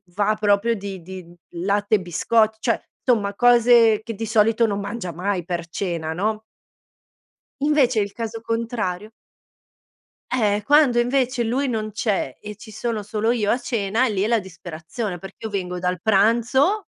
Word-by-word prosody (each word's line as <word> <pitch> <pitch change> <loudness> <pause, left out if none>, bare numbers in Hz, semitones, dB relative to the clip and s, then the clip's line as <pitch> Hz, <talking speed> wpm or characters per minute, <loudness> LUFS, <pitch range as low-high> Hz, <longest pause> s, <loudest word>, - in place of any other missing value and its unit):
va 210 +1 +2
proprio 210 +2 +2
di 195 -3 -7
di 175 0 -10 0.2
latte 200 +4 0
e 200 - 0
biscotti, 220 +5 +1
cioè 230 - 0 0.2
insomma 210 -5 +2
cose 235 -2 +5
che 230 - -5
di 225 +3 -4
solito 225 +1 +3
non 200 -1 -2
mangia 200 -2 -5
mai 185 +1 -2
per 170 -1 -4
cena, 170 -3 -3
no? 215 +4 -1 1.2
Invece 285 -6 +3
il 200 -1 -1
caso 225 -1 -5
contrario 225 -4 -3 1.2
Eh, 210 -5 +1
quando 280 -3 +4
invece 250 0 +1
lui 260 +5 0
non 215 -3 -2
c'è 200 - -2
e 210 0 -8
ci 215 - -13
sono 220 0 -3
solo 210 +2 -1
io 215 -4 0
a - - +3
cena, 230 -1 0
lì 205 -4 -1
è 210 - +1
la 230 -1 +3
disperazione, 180 +2 -6
perché 195 +3 -11
io - - -3
vengo 180 -3 -3
dal 180 0 -1
pranzo 235 - +3
215 Hz, 160 wpm, -22 LUFS, 195-235 Hz, 1.2 s, cose